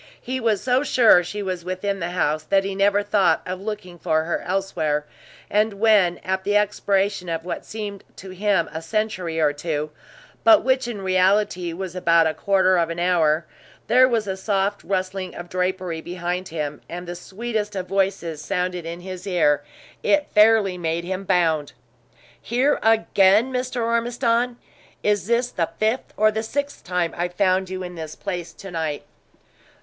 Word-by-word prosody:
He 260 +1 -4
was 225 -5 0
so 255 +1 +2
sure 235 -10 +5
she 205 +4 -5
was 185 -3 -3
within 185 +2 -3
the 170 -1 -2
house, 155 -3 0
that 195 +3 +2
he 195 0 -3
never 200 +1 +2
thought 205 -1 +2
of 185 +1 -5
looking 195 -4 -6
for 160 -2 +1
her 170 - -2
elsewhere; 160 -6 -1 0.4
and 210 +1 +1
when, 200 -5 +4
at 190 0 -1
the 205 +1 +2
expiration 200 -2 0
of 165 0 -3
what 175 -2 -5
seemed 205 -2 -6
to 190 0 -10
him 190 -2 +1
a 160 - -4
century 185 -3 -2
or 150 -2 +3
two, 150 0 -3 0.5
but 330 -2 +7
which 260 -1 +1
in 210 -5 -5
reality 185 -1 +2
was 180 +1 -6
about 170 -2 +4
a 160 - +1
quarter 190 -1 +2
of 165 -1 +1
an 165 - -4
hour, 170 -3 +2 0.4
there 255 +2 +5
was 230 -4 0
a 190 -1 -3
soft 200 +1 -1
rustling 185 -1 -3
of 175 0 -8
drapery 180 -2 -2
behind 180 +1 -4
him, 150 -2 -4
and 175 +1 -6
the 175 - -4
sweetest 210 +3 -4
of 185 -1 -3
voices 190 -5 -1
sounded 180 -1 -2
in 170 +1 -6
his 185 +1 -8
ear, 145 -6 +2 0.4
it 300 -1 +2
fairly 210 -4 +4
made 165 0 -1
him 185 +2 -4
bound. 165 -6 +1 0.7
"Here 255 +5 +1
again, 220 +1 +4
Mr. 250 -1 -2
Ormiston? 235 +1 0 0.5
Is 205 -2 +1
this 240 +1 +1
the 165 -2 -1
fifth 220 +4 0
or 215 0 +4
sixth 285 +5 -4
time 180 -2 -1
I've 175 +1 -3
found 190 -1 +2
you 185 0 -4
in 180 0 -7
this 160 -2 -7
place 175 -4 -5
to 195 - -10
night?" 160 -3 -3
190 Hz, 170 wpm, -23 LUFS, 175-210 Hz, 0.7 s, but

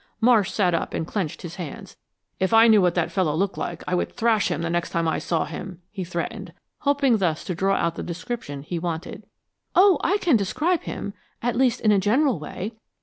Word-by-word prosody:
Marsh 230 -3 +4
sat 180 -4 +1
up 165 - -1
and 160 - -2
clenched 175 -3 -3
his 175 0 -7
hands. 170 -6 -7 0.4
"If 190 +4 +2
I 225 +1 +8
knew 215 -3 +6
what 180 -2 +2
the 175 -2 +1
fellow 170 -6 0
looked 195 +3 0
like - - -4
I - - -1
would 180 - 0
thrash 225 -2 +2
him 175 -1 -2
the 170 - -1
next 175 0 -1
time 165 -1 0
I 160 - 0
saw 165 -2 0
him," 185 -2 -7
he 195 -3 -4
threatened, 170 -1 -5 0.3
hoping 280 -4 +3
thus 170 -6 0
to 180 - -3
draw 195 +3 +1
out 170 - 0
the - - -6
description 170 - -5
he 170 +3 -4
wanted. 165 0 -5 0.5
"Oh, 375 +1 +6
I 390 +4 +3
can 335 - +3
describe 310 - 0
him 200 - -5 0.3
at 240 -1 0
least 250 -1 +2
in 215 - +4
a 200 - +4
general 235 - +2
way. 185 +7 -6
190 Hz, 215 wpm, -24 LUFS, 170-230 Hz, 0.5 s, I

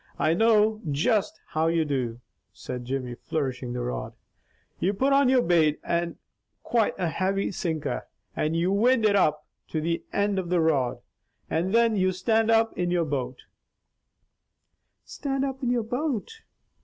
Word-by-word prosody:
I 160 - +2
know 215 +2 +3
just 170 +9 +1
how 160 0 0
you 165 -1 +2
do," 125 -5 -2 0.3
said 125 -1 -7
Jimmy 130 -1 -3
flourishing 130 -2 -3
the 125 - -3
rod. 60 - -4 0.7
"You 195 +3 0
put 270 +6 +2
on 275 -2 +4
your 255 -2 +4
bait 160 -3 +3
and 170 0 -1 0.5
quite 230 -3 +1
a 180 -3 0
heavy 190 +4 -1
sinker, 160 -5 -3 0.3
and 155 +2 0
you 170 +3 +1
wind 230 +3 +3
it 205 -1 +4
up 155 -5 +2 0.2
to 160 - -2
the 165 +2 -1
ind 200 -1 +1
of 180 -2 -5
your 175 -2 +3
rod, 140 -6 +1 0.5
and 170 +4 0
thin 230 0 +4
you 185 0 +2
stand 220 +4 +1
up 225 0 +3
in 175 0 -1
your 175 -1 +1
boat 130 -4 -4 0.8
" - - -54 0.7
"Stand 275 -1 -2
up 270 0 -5
in 250 - 0
your 245 -2 +1
boat!" 250 - -2
180 Hz, 165 wpm, -26 LUFS, 155-225 Hz, 0.8 s, on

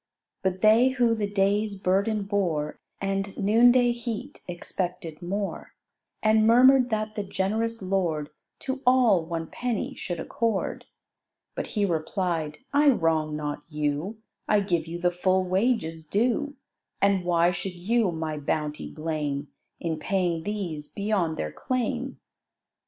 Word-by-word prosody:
But 190 0 -1
they 225 +4 +6
who 245 -3 +2
the 210 -2 -1
day's 200 0 +1
burden 200 +3 +1
bore 180 -7 -1 0.2
And 195 0 -2
noonday 240 +4 +5
heat, 240 +3 -5
expected 175 -2 -4
more: 195 +3 -4 0.5
And 220 0 +4
murmur'd 255 +2 +6
that 215 -1 -1
the 210 - -2
generous 215 +3 -1
lord 170 -6 -1 0.3
To 265 0 -3
all 240 -9 +5
one 165 0 -4
penny 240 +4 -3
should 175 -2 -5
accord. 230 -7 -2 0.7
But - - -4
he 205 - +3
replied, 165 -2 -1 0.2
"I 290 +1 +5
wrong 160 - +1
not 150 -1 -3
you; 150 +7 -2 0.3
I 210 -1 +4
give 175 -5 0
you 170 +1 -5
the 175 0 +2
full 185 +1 +2
wages 185 -5 0
due; 245 - 0 0.4
And 200 -2 +3
why 175 0 +3
should 180 +1 -5
you 205 +3 +1
my 160 -2 -3
bounty 150 +1 -2
blame, 150 -3 -3 0.3
In 160 -2 -2
paying 175 -1 0
these 175 -6 -4
beyond 200 -6 0
their 75 - -3
claim?" 255 -3 -2
190 Hz, 135 wpm, -26 LUFS, 165-220 Hz, 0.7 s, they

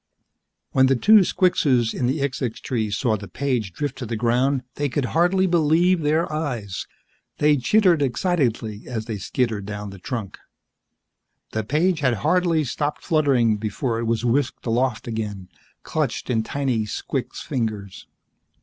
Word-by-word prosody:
When 130 0 +4
the 135 - +3
two 215 - +6
squixes 140 - +2
in 125 - -1
the 140 +3 -1
xixxix 130 -4 -2
tree 110 -5 -2
saw 110 +2 0
the 105 0 -9
page 125 -7 -2
drift 140 +5 -4
to 125 - -5
the 115 - -3
ground, 125 +4 +1
they 145 0 -1
could 135 +1 -1
hardly 180 +3 +3
believe 170 +1 +3
their 155 +3 +2
eyes. 120 -11 -3 0.5
They 150 0 +4
chittered 175 - +3
excitedly 120 - -1
as 110 -3 -4
they 110 -3 -4
skittered 110 -1 -1
down 105 -1 -5
the 100 - -11
trunk. 110 -1 -5 1.1
The 110 - -2
page 155 - +1
had 130 -5 +2
hardly 170 -1 +3
stopped 145 +3 -3
fluttering 135 - +2
before 115 +3 -2
it 115 - -2
was 115 +1 0
whisked 130 +2 0
aloft 120 0 0
again, 105 -5 -4 0.3
clenched - - -2
in 115 -2 +2
tiny 125 -2 -1
squix 105 - -4
fingers. 105 -6 -4
125 Hz, 150 wpm, -23 LUFS, 110-150 Hz, 1.1 s, two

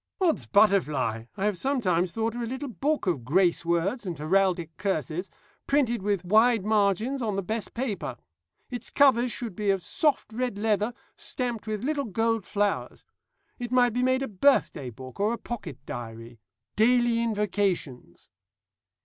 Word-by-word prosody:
'Od's 355 -5 +1
butterfly!' 150 - +2
I 195 - -1
have 205 -4 0
sometimes 185 -11 +1
thought 225 +2 -1
of 240 - -4
a 235 - -2
little 265 +4 -4
book 290 +4 -1
of 165 -10 0
grace 170 +5 +2
words 170 +8 0
and 180 -5 -4
heraldic 175 +1 +1
curses, 180 -1 -2 0.4
printed 250 -6 +2
with 200 -2 -1
wide 220 +2 +4
margins 215 +5 +1
on 215 -4 -1
the 195 - -1
best 220 +3 -3
of - - -22
paper. 235 -4 -3 0.5
Its 245 -1 -5
covers 255 -4 +4
should 230 -7 -4
be 210 +1 -1
of 195 -2 +1
soft 295 -7 0
red 245 -2 -2
leather, 210 +1 +1 0.3
stamped 240 -4 -3
with 215 0 -3
little 285 0 -1
gold 225 0 0
flowers. 205 0 -1 0.5
It 240 -1 -5
might 245 -2 +4
be 250 - 0
made 260 +1 +2
a - - -2
birthday 190 - +2
book, 130 - -11
or 210 +3 +2
a - - -3
pocket 200 - -6
diary 115 -1 -8 0.4
'Daily 240 +1 +3
Invocations.' 200 - -2
210 Hz, 160 wpm, -27 LUFS, 180-240 Hz, 0.5 s, wide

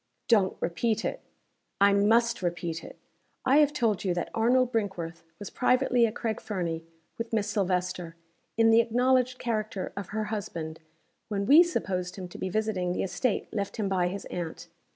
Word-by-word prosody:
"Don't 205 -5 +3
repeat 215 +6 0
it!" - - -3 0.6
"I 200 0 +6
must 230 +3 +3
repeat 170 -2 -3
it! - - -11 0.5
I 265 +2 +5
have 295 -1 +5
told 230 -9 0
you 180 -3 0
that 175 - -3
Arnold 245 +2 +3
Brinkworth 180 -7 -3 0.2
was 205 - -8
privately 250 -2 +3
at 215 - -6
Craig 225 -3 -2
Fernie, 170 -5 -3 0.4
with 230 0 -4
Miss 215 -2 0
Silvester, 180 -4 -1 0.4
in 225 0 +5
the 225 +1 +7
acknowledged 250 +2 +2
character 215 -5 -3
of 200 -2 -5
her 215 +3 -2
husband 165 -6 -5 0.5
when 200 -2 -2
we 295 +9 +8
supposed 185 - -1
him 185 -2 -6
to - - -10
be 190 - -2
visiting 190 -3 -1
the - - -1
estate 195 +7 -1
left 200 -3 -3
him 210 -3 -1
by 185 -2 +1
his 195 +2 -5
aunt. 170 -2 -5
205 Hz, 175 wpm, -28 LUFS, 180-230 Hz, 0.6 s, we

